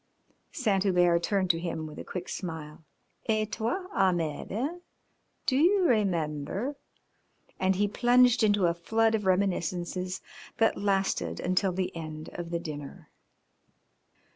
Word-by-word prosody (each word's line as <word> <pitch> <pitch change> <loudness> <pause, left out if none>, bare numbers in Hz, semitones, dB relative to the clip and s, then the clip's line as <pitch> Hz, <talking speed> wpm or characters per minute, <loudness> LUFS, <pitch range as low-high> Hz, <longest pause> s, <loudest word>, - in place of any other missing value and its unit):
Saint 210 - +1
Hubert 175 -3 +3
turned 190 0 +2
to 165 - -4
him 165 -2 -3
with 150 -1 -9
a - - -5
quick 180 -1 -6
smile. 160 -3 -6 0.5
"Et 215 -1 +1
toi, 240 - -2
Ahmed, 175 -6 0
eh? 275 - -2 0.7
Do 265 - +2
you 365 +7 +4
remember 195 - 0 0.4
?" - - -37
and 190 0 +2
he 205 +2 +2
plunged 245 +3 +4
into 205 -3 +3
a 170 - +3
flood 220 +6 +1
of 210 -3 0
reminiscences 185 -1 0 0.4
that 225 - +3
lasted 190 - 0
until 185 +1 +1
the 180 0 -2
end 155 -1 -7
of 175 -1 -6
dinner. 145 -3 -8
190 Hz, 135 wpm, -29 LUFS, 170-220 Hz, 0.7 s, you